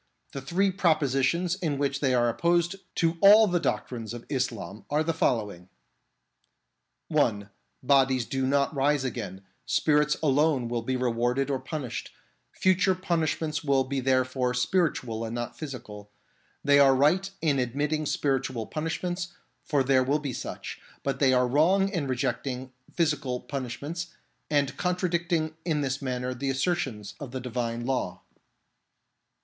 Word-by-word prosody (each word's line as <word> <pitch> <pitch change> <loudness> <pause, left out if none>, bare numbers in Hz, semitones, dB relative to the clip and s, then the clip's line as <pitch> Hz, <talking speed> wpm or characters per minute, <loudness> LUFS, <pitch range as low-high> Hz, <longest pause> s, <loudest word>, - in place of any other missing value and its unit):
The 135 - -6
three 185 +8 +1
propositions 165 -1 +1
in 160 -7 -1
which 140 0 0
they 130 -3 +2
are 120 -1 +3
opposed 170 +8 +1 0.2
to 165 0 +1
all 210 +3 +9
the 180 -3 +1
doctrines 120 -8 -3
of 120 - -9
Islam 115 -7 -3
are 150 +2 +2
the 165 +1 0
following: 105 - -1 1.4
(1) 100 -2 +1 0.3
Bodies 130 -2 +3
do 135 +1 -1
not 140 +2 +2
rise 145 0 +2
again; 105 -7 -5 0.2
spirits 150 0 +2
alone 145 -3 +2
will 120 -1 -1
be 130 +3 -2
rewarded 125 +2 0
or 135 - 0
punished; 135 -7 -5 0.4
future 185 +1 +2
punishments 160 -4 -1
will 140 -2 +3
be 135 +1 -2
therefore 130 -1 +1
spiritual 125 -6 0
and 115 +1 -4
not 120 0 -4
physical. 110 -8 -8 0.5
They 145 0 +5
are 135 -1 +6
right 165 +9 +3
in 145 -4 +1
admitting 145 +5 -1
spiritual 135 -5 -1
punishments, 175 - -3 0.3
for 145 -5 +1
there 130 -1 +3
will 140 +3 +2
be 145 -4 -4
such; - - -6 0.2
but 135 -1 -2
they 135 -2 +4
are 125 -1 +3
wrong 180 +9 +3
in 170 -8 -2
re 130 -1 -1
jecting 130 +1 -3 0.2
physical 145 -6 0
punishments, 140 +6 -5 0.4
and 145 -2 +1
contradicting 170 -3 0
in 155 -4 0
this 135 0 -2
manner 125 -1 -2
the 135 +2 -3
assertions 135 - -1
of 145 -4 -6
the 130 +1 -5
Divine 120 -1 -3
Law. 120 -9 -2
135 Hz, 145 wpm, -27 LUFS, 125-160 Hz, 1.4 s, all